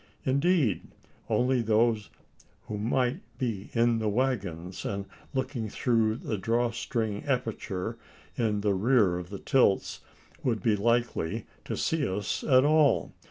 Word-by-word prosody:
Indeed, 140 - +2 0.5
only 125 0 +2
those 110 -1 +2 0.5
who 105 - -5
might 125 - +1 0.2
be 110 -6 -3
in 115 0 +3
the 110 -1 0
waggons, 100 -8 -2
and 100 -1 -3 0.3
looking 130 -5 -2
through 115 -1 +1
the 110 -3 -4
draw 115 +3 +1
string 110 -2 -2
aperture 115 -5 -2 0.4
in 105 -3 0
the 100 -1 +2
rear 100 -3 +3
of 90 0 -8
the 100 - -6
tilts, 125 -5 +2 0.4
would 115 -6 0
be 110 -2 +3
likely 115 -5 0 0.2
to - - -3
see 160 -4 0
us 100 +2 -2
at 130 -1 +5
all. 150 -1 +3
115 Hz, 135 wpm, -28 LUFS, 105-130 Hz, 0.5 s, at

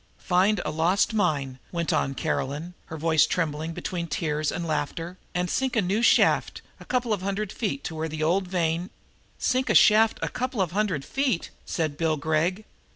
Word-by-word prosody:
"Find 190 +2 +2
a - - -1
lost 175 +8 +2
mine," 145 -10 0
went 170 -2 -1
on 135 0 0
Caroline, 155 +2 -2
her 160 - -6
voice 160 0 +3
trembling 160 -1 -1
between 170 0 -4
tears 155 -2 -1
and 170 - -3
laughter, 165 +4 -3 0.2
"and 180 0 0
sink 260 +7 -1
a 225 - +4
new 195 +5 0
shaft, 235 - +3 0.2
a - - -12
couple 245 -3 0
of 200 - -2
hundred 200 +1 -2
feet 245 +5 -3
to - - -3
find - - -7
where 160 +1 -2
the 155 0 -3
old 180 +4 +1
vein 175 0 -1 0.3
" - - -36
"Sink 255 +1 0
a - - +3
shaft 220 +1 +6
a - - +1
couple 255 -2 -3
of 185 -4 +1
hundred 190 -8 -1
feet!" 265 -10 -1 0.2
said 155 -4 -2
Bill 160 -2 +1
Gregg. 160 +7 0
175 Hz, 195 wpm, -26 LUFS, 155-205 Hz, 0.3 s, shaft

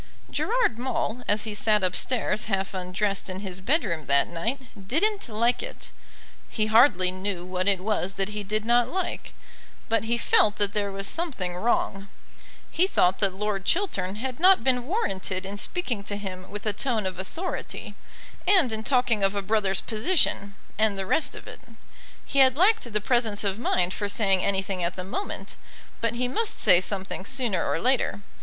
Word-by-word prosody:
Gerard 465 - 0
Maule, 250 -1 -2
as 205 0 +2
he 215 -1 -4
sat 210 -1 +2
upstairs 215 +4 +1
half 195 -2 -2
undressed 190 +2 -2
in 185 +1 -5
his 190 -2 -6
bedroom 190 - -1
that 140 0 +3
night 225 +11 -3 0.3
didn't 400 - 0
like 235 +3 +1
it. - - -8 0.6
He 215 - 0
hardly 215 -5 +4
knew 185 -1 -4
what 185 +1 -2
it 195 -2 +2
was 195 -2 -1
that 195 +1 -1
he 210 0 -5
did 215 +2 -2
not 240 0 +3
like, 375 -1 -3 0.6
but 225 0 +1
he 235 +1 0
felt 215 -2 +4
that 205 -1 +1
there 205 -1 -1
was 195 0 -4
something 245 - -2
wrong. 195 -1 -1 0.6
He 360 +3 +2
thought 180 - +2
that 195 -2 +2
Lord 205 -1 -2
Chiltern 200 - 0
had 255 +4 -5
not 375 +2 +6
been 250 -1 +1
warranted 195 - -2
in 200 +1 -5
speaking 240 - -1
to 205 - -3
him 185 -2 -7
with 205 +2 -7
a 215 - 0
tone 225 -2 -1
of 185 -1 -4
authority, 330 - -5 0.5
and 355 - +5
in 220 0 -2
talking 245 -4 +2
of 195 +1 +2
a 200 - -2
brother's 195 -2 +1
position, 215 - 0 0.2
and 215 -2 +2
the 195 - -2
rest 315 - +1
of - - -10
it. - - -10 0.7
He 275 - 0
had 260 0 +6
lacked 380 - +3
the 210 0 +1
presence 220 -3 0
of 200 +1 -1
mind 180 -6 +1
for 205 -1 -3
saying 195 -3 +2
anything 190 -2 -1
at 170 +1 -1
the 185 - -4
moment; 295 - -5 0.4
but 230 0 0
he 250 +1 0
must 440 - -1
say 180 - +6
something 190 0 -4
sooner 240 -5 -1
or - - -1
later. 255 -3 +1
210 Hz, 180 wpm, -26 LUFS, 190-245 Hz, 0.7 s, not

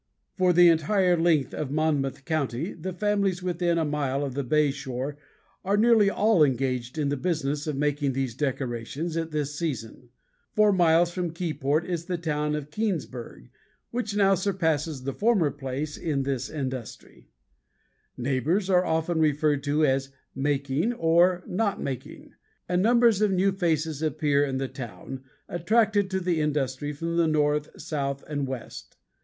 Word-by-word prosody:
For 185 -1 +3
the 175 0 +7
entire 180 +3 +3
length 165 -4 +2
of 150 - -3
Monmouth 145 -3 -1
county 155 - -2
the 180 +3 -5
families 200 -1 0
within 175 -1 0
a 165 - +1
mile 145 -2 -1
of 135 - -5
the 140 +1 -2
bay 150 +2 +2
shore 135 0 -5 0.5
are 200 +2 +1
nearly 220 -2 +5
all 205 -4 +3
engaged 130 -1 -1
in 145 -2 0
the 145 - 0
business 150 -2 -1
of 150 - -1
making 145 -1 0
these 130 -2 -2
decorations 135 +3 -3
at 165 -1 -2
this 150 -2 -2
season. 130 -6 -5 0.5
Four 210 -1 +5
miles 170 -1 +4
from 175 -2 -3
Keyport 155 -2 -1
is 170 -2 -3
the 180 -1 -2
town 150 -2 -1
of 150 0 -6
Keansburg 155 - -4 0.4
which 235 -4 -3
now 195 -1 +4
surpasses 160 -7 -1
the 135 +1 -3
former 200 - +2
place 145 +1 -5
in 145 -5 -1
this 135 -2 -2
industry. 130 -6 -6 0.9
Neighbors 140 - 0
are 180 -3 +3 0.2
referred 150 -2 +2
to 150 +2 +2
as 135 -1 +1 0.2
"making" 140 - 0
or 175 -1 +3
"not 200 +1 -1
making" 130 -3 -6 0.3
and 180 +1 +1
numbers 235 -1 +4
of 210 - +4
new 190 +1 +2
faces 160 -5 -1
appear 150 -2 +1
in 135 -2 -1
the 135 0 -2
town, 130 +1 -8 0.3
attracted 205 +3 +2
by 190 - -1
the 175 -3 0
industry 145 -1 -1
from 165 +3 -3
the 170 -1 +3
north, 150 -1 +1
south, 140 -2 -3
and 145 -2 -2
west. 130 -3 -8
155 Hz, 155 wpm, -26 LUFS, 140-180 Hz, 0.9 s, the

